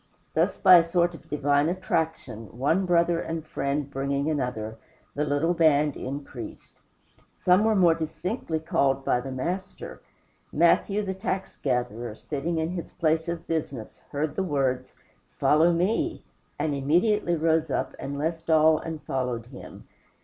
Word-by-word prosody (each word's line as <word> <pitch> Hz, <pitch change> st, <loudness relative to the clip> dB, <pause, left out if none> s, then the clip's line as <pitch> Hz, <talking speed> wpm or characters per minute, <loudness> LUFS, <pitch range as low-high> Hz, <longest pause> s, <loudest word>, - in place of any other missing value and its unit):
Thus, -, -, +1 dB
by 185 Hz, -, +8 dB
a 170 Hz, -, +5 dB
sort 175 Hz, +1 st, +1 dB
of 165 Hz, -, -14 dB
divine 145 Hz, +1 st, +2 dB
attraction, 160 Hz, -, -3 dB
one 165 Hz, +9 st, +1 dB
brother 170 Hz, -1 st, +3 dB
and 160 Hz, -2 st, -4 dB
friend 140 Hz, -1 st, -2 dB
bringing 140 Hz, +2 st, -1 dB
another, 110 Hz, -6 st, -3 dB, 0.3 s
the 150 Hz, -, -1 dB
little 150 Hz, +4 st, +1 dB
band 150 Hz, -3 st, +3 dB
increased. 140 Hz, +3 st, -8 dB, 0.6 s
Some 180 Hz, +3 st, +3 dB
were 220 Hz, 0 st, +3 dB
more 175 Hz, -4 st, +5 dB
distinctly 160 Hz, +2 st, -3 dB
called 135 Hz, -3 st, 0 dB
by 125 Hz, -, +2 dB
the 135 Hz, -, -6 dB
Master. 180 Hz, +9 st, -5 dB, 0.5 s
Matthew, 210 Hz, +1 st, +3 dB
the 190 Hz, -1 st, -2 dB
tax 190 Hz, -1 st, -4 dB
gatherer, 120 Hz, -4 st, -2 dB
sitting 155 Hz, +7 st, -3 dB
in 160 Hz, +1 st, -1 dB
his 175 Hz, -2 st, -5 dB
place 160 Hz, 0 st, 0 dB
of 170 Hz, -1 st, -4 dB
business, 140 Hz, -8 st, -4 dB
heard 145 Hz, +1 st, -2 dB
the -, -, 0 dB
words, 135 Hz, -7 st, -1 dB, 0.4 s
"Follow 160 Hz, +3 st, +4 dB
me," 220 Hz, -, 0 dB, 0.3 s
and 155 Hz, -, -1 dB
immediately 175 Hz, +7 st, +2 dB
rose 160 Hz, 0 st, +1 dB
up, -, -, -2 dB
and 140 Hz, +1 st, -5 dB
left 165 Hz, +2 st, -3 dB
all 155 Hz, 0 st, +5 dB
and 160 Hz, -2 st, -6 dB
followed 125 Hz, -3 st, -2 dB
him. 125 Hz, +1 st, -12 dB
155 Hz, 150 wpm, -26 LUFS, 140-170 Hz, 0.6 s, by